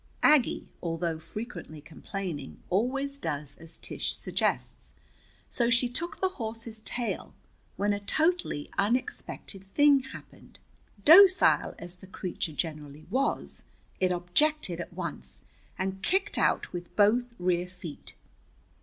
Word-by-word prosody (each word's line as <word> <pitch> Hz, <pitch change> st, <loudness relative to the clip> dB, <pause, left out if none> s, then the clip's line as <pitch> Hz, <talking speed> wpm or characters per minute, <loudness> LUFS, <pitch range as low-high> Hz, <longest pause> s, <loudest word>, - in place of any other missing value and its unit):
Aggie, 300 Hz, -6 st, +4 dB
although 165 Hz, -1 st, -2 dB
frequently 165 Hz, -2 st, -7 dB
complaining, 160 Hz, -1 st, -6 dB
always 275 Hz, +8 st, 0 dB
does 150 Hz, -, -3 dB
as 165 Hz, 0 st, -11 dB
Tish -, -, -3 dB
suggests. -, -, -2 dB, 0.5 s
So 235 Hz, -1 st, +1 dB
she 240 Hz, +1 st, +3 dB
took 320 Hz, +8 st, -4 dB
the 375 Hz, -, +2 dB
horse's 225 Hz, 0 st, -5 dB
tail, 235 Hz, +2 st, -4 dB, 0.4 s
when 205 Hz, +1 st, +2 dB
a 205 Hz, -, -2 dB
totally 310 Hz, -, 0 dB
unexpected 215 Hz, -, -1 dB
thing 285 Hz, +8 st, +5 dB
happened. -, -, -13 dB, 0.5 s
Docile 375 Hz, +3 st, +7 dB
as 175 Hz, +1 st, -7 dB
the 190 Hz, -, -14 dB
creature 180 Hz, -3 st, -4 dB
generally 150 Hz, -1 st, -5 dB
was, 265 Hz, +4 st, -1 dB, 0.4 s
it 185 Hz, -1 st, +2 dB
objected 180 Hz, -, +1 dB
at -, -, -8 dB
once, 170 Hz, -, -6 dB, 0.3 s
and 190 Hz, 0 st, -2 dB
kicked 385 Hz, -, +1 dB
out -, -, +1 dB
with 175 Hz, 0 st, -7 dB
both 220 Hz, +4 st, +4 dB
rear 180 Hz, 0 st, +1 dB
feet. 180 Hz, -4 st, -9 dB
195 Hz, 120 wpm, -29 LUFS, 170-250 Hz, 0.5 s, Docile